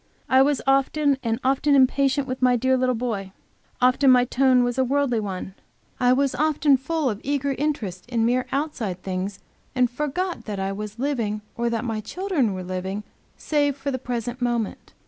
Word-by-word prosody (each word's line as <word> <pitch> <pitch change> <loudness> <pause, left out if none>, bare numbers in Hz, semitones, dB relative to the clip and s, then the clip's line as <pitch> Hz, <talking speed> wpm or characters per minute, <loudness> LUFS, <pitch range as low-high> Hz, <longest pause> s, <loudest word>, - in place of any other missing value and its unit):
I 260 0 +5
was 285 0 +2
often 275 +1 +2
and 230 -1 -1
often 275 +2 +3
impatient 270 +1 +3
with 255 0 -4
my 250 -1 +4
dear 260 +2 +2
little 255 -1 +1
boy; 215 -5 -3 0.5
often 255 +2 +4
my 250 -1 +6
tone 255 0 +3
was 245 +1 -1
a - - +4
worldly 265 -2 +1
one; 190 -2 -5 0.5
I 245 - +3
often 280 +3 +3
full 310 +3 -1
of 215 -4 -2
eager 280 0 -1
interest 245 -10 -3
in 230 -2 +1
mere 250 +2 +1
outside 255 - -3
things, 190 +1 -3 0.4
and 250 -1 +2
forgot 300 +7 -3
that 205 -3 -4
I 195 0 -1
was 210 +2 -6
living 235 -6 -1
or 235 0 0
that 230 +1 -2
my 225 -2 -2
children 295 - -1
were 185 - -5
living 185 +3 -4 0.3
save 290 -2 0
for 280 0 -3
the 260 - -3
present 245 0 -4
moment. 240 -3 -2
255 Hz, 180 wpm, -24 LUFS, 225-275 Hz, 0.5 s, my